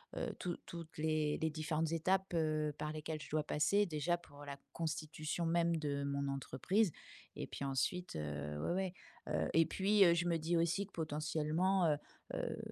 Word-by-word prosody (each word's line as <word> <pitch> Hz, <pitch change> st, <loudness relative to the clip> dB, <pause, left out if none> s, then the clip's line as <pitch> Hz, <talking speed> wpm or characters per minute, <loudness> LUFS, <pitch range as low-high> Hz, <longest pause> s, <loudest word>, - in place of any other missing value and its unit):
heu, -, -, -2 dB
tou 175 Hz, -1 st, -2 dB
toutes 170 Hz, -1 st, -8 dB
les 155 Hz, -1 st, +1 dB
les 160 Hz, -, +2 dB
différentes 155 Hz, +1 st, -1 dB
étapes 185 Hz, +3 st, +1 dB
heu, 155 Hz, -2 st, +1 dB
par 150 Hz, 0 st, -3 dB
lesquelles 155 Hz, 0 st, -4 dB
je -, -, -9 dB
dois 155 Hz, 0 st, +1 dB
passer, 200 Hz, +8 st, +3 dB
déjà, 165 Hz, +1 st, 0 dB
pour 145 Hz, -4 st, -13 dB
la 140 Hz, 0 st, -6 dB
constitution 155 Hz, 0 st, -2 dB
même 170 Hz, 0 st, +3 dB
de 145 Hz, -3 st, -1 dB
mon 140 Hz, 0 st, -1 dB
entreprise 140 Hz, -, +1 dB, 0.4 s
et -, -, -4 dB
puis 140 Hz, -, -4 dB
ensuite, 175 Hz, +7 st, -1 dB
heu, 75 Hz, -1 st, -3 dB
ouais, -, -, 0 dB
ouais. 190 Hz, -1 st, 0 dB, 0.4 s
Heu -, -, +1 dB
et 165 Hz, 0 st, +6 dB
puis, 195 Hz, +4 st, +4 dB
heu, 170 Hz, -, +7 dB
je 170 Hz, +1 st, +1 dB
me 170 Hz, -1 st, +2 dB
dis 165 Hz, +2 st, 0 dB
aussi 170 Hz, +4 st, +2 dB
que -, -, -27 dB
potentiellement, 160 Hz, +4 st, +1 dB
heu 145 Hz, -, +2 dB, 0.4 s
heu, -, -, -2 dB
160 Hz, 185 wpm, -37 LUFS, 150-175 Hz, 0.4 s, heu